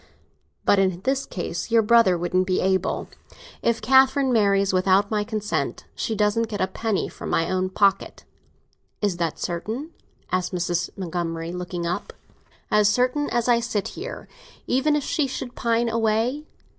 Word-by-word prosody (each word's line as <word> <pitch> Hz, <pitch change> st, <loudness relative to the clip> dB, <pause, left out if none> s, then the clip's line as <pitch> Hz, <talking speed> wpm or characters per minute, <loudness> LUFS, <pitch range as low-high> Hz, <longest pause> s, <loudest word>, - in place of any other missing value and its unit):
But 200 Hz, -, +4 dB
in 185 Hz, -2 st, +1 dB
this 270 Hz, +4 st, -1 dB
case 175 Hz, 0 st, -4 dB
your 230 Hz, -1 st, +4 dB
brother 220 Hz, -5 st, +5 dB
wouldn't 185 Hz, +2 st, 0 dB
be 185 Hz, -, +1 dB
able. 190 Hz, -1 st, 0 dB, 0.5 s
If 230 Hz, -2 st, 0 dB
Catherine 265 Hz, +2 st, +4 dB
marries 200 Hz, -3 st, +3 dB
without 190 Hz, +2 st, +3 dB
my 210 Hz, -1 st, +1 dB
consent, 210 Hz, -1 st, -3 dB
she 225 Hz, -, -3 dB
doesn't 210 Hz, +2 st, +1 dB
get 205 Hz, -2 st, -5 dB
a -, -, +3 dB
penny 215 Hz, +1 st, -2 dB
from -, -, -8 dB
my 165 Hz, -, +1 dB
own 185 Hz, 0 st, 0 dB
pocket." 195 Hz, 0 st, +1 dB, 0.8 s
"Is 200 Hz, -4 st, 0 dB
that 170 Hz, -2 st, -2 dB
certain?" 220 Hz, -, -4 dB, 0.4 s
asked 185 Hz, 0 st, -1 dB
Mrs. 175 Hz, 0 st, -1 dB
Montgomery, 170 Hz, -2 st, -3 dB
looking 180 Hz, -1 st, -4 dB
up. 170 Hz, +1 st, -3 dB, 0.6 s
"As 210 Hz, -1 st, +5 dB
certain 250 Hz, +7 st, +1 dB
as 240 Hz, -1 st, 0 dB
that 245 Hz, -, +3 dB
I 235 Hz, -, +4 dB
sit 225 Hz, -4 st, -2 dB
here!" 445 Hz, +7 st, -7 dB, 0.4 s
"Even 285 Hz, +4 st, +2 dB
if 295 Hz, -, 0 dB
she 310 Hz, -2 st, 0 dB
should 255 Hz, -1 st, -6 dB
pine 235 Hz, -1 st, 0 dB
away?" 230 Hz, +5 st, 0 dB
210 Hz, 160 wpm, -24 LUFS, 185-235 Hz, 0.8 s, brother